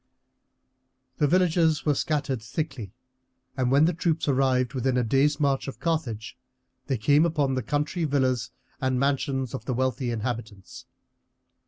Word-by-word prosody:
The 150 - +3
villages 165 -2 +2
were 150 - +3
scattered 140 -4 -1
thickly, 120 - -5 0.6
and 130 -2 0
when 140 +4 +5
the 175 - +2
troops 165 -1 -1
arrived 130 -2 +2
within 130 -1 0
a 125 - +2
day's 140 +6 +2
march 140 -2 +1
of 135 - -7
Carthage 130 -10 -2 0.5
they 135 -3 0
came 145 +7 +4
upon 150 -5 +1
the 130 - -1
country 150 - -1
villas 130 -5 0 0.3
and 130 -1 +1
mansions 135 -2 0
of 135 - -6
the 130 - -2
wealthy 130 0 -1
inhabitants. 115 -3 -5
135 Hz, 145 wpm, -26 LUFS, 125-150 Hz, 0.6 s, when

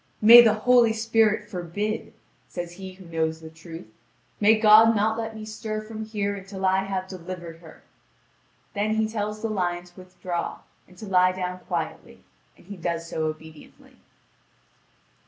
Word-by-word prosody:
"May 235 +3 +10
the 220 -3 +4
Holy 235 0 +4
Spirit 220 -1 +1
forbid!" 205 +3 -4 0.4
says 175 -1 -6
he 190 +1 -9
who 185 0 -15
knows 160 -1 -2
the 160 0 -11
truth; 165 -1 -11 0.5
"may 215 +2 +5
God 220 +1 +7
not 215 +1 +1
let 225 -1 -5
me 215 0 -8
stir 215 0 -5
from 220 0 -7
here 205 -2 -2
until 195 0 -6
I 190 +1 +2
have 190 -1 -3
delivered 175 -2 -8
her!" 165 -1 -16 0.9
Then 215 +1 -1
he 220 0 +1
tells 210 -1 -4
the 225 - -1
lion 175 -4 -2
to 180 +1 -17
withdraw 180 -1 -5 0.3
and 180 - -20
to 215 - -9
lie 185 -2 +3
down 180 0 -4
quietly, - - -6 0.3
and - - -20
he 200 +1 -9
does 170 -1 -3
so 160 -1 -3
obediently. 155 0 -11
195 Hz, 160 wpm, -25 LUFS, 175-215 Hz, 0.9 s, May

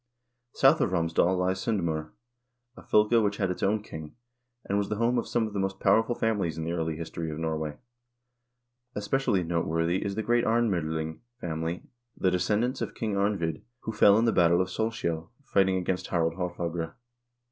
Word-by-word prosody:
South 135 +4 +5
of 120 - +2
Romsdal 85 +1 +2
lies 95 +1 0
S0ndm0r, 85 -8 -1 0.7
a - - -12
fylke 110 +2 +3
which 100 0 0
had 95 -2 0
its 90 - -5
own 105 +1 +1
king, 80 -6 -9 0.5
and 100 +1 0
was 100 - -2
the 105 - -1
home 120 +3 +2
of - - -4
some 120 -2 +1
of 105 - -6
the 100 - -2
most 95 0 -2
powerful 110 +4 +3
families 100 -10 0
in 80 - -3
the 80 - -2
early 80 -2 -1
history 80 0 -5
of 75 - -5
Norway. 80 -2 -3 1.2
Especially 105 -2 +1
noteworthy 85 +1 0
is 100 -1 -3
the 110 - -2
great 120 +2 +2
Arnm0dling 80 -9 0 0.2
family, 80 -1 -3 0.3
the 95 - +2
descendants 105 +8 0
of - - -3
King 110 -3 -2
Arnvid 100 -6 0 0.2
who 110 - -4
fell 105 -1 +6
in 115 - +3
the 115 - +4
battle 85 -2 +4
of 95 0 0
Solskjel 90 -7 -2
fighting 95 -6 +2
against 90 0 -2
Harald 80 -2 +1
Haarfagre. 85 -2 -3
95 Hz, 180 wpm, -28 LUFS, 80-105 Hz, 1.2 s, fell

